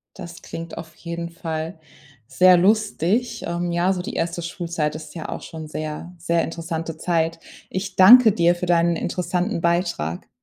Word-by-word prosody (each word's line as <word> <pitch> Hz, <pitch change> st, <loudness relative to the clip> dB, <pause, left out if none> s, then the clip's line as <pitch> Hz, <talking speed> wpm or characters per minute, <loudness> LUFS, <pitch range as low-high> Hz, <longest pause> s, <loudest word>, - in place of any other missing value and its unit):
Das 170 Hz, 0 st, -9 dB
klingt 165 Hz, 0 st, -8 dB
auf 160 Hz, -1 st, -9 dB
jeden 170 Hz, +1 st, -6 dB
Fall 165 Hz, -1 st, -5 dB, 0.5 s
sehr 185 Hz, 0 st, +5 dB
lustig. 215 Hz, +3 st, +1 dB
Ähm, 175 Hz, 0 st, -2 dB
ja, 175 Hz, +3 st, +2 dB
so 180 Hz, -, -3 dB
die -, -, -6 dB
1. 170 Hz, +1 st, -2 dB
Schulzeit 170 Hz, -3 st, -3 dB
ist 155 Hz, -, -9 dB
ja 165 Hz, -, -6 dB
auch -, -, -5 dB
schon 160 Hz, -1 st, -8 dB
sehr 155 Hz, +3 st, -6 dB
sehr 170 Hz, 0 st, 0 dB
interessante 165 Hz, -1 st, -5 dB
Zeit. 165 Hz, -1 st, 0 dB, 0.3 s
Ich 190 Hz, 0 st, -4 dB
danke 225 Hz, +4 st, +9 dB
dir 175 Hz, -2 st, +3 dB
für 175 Hz, -, -4 dB
deinen 170 Hz, -1 st, +3 dB
interessanten 180 Hz, +3 st, -2 dB
Beitrag. 170 Hz, -, -1 dB
170 Hz, 160 wpm, -22 LUFS, 165-180 Hz, 0.5 s, danke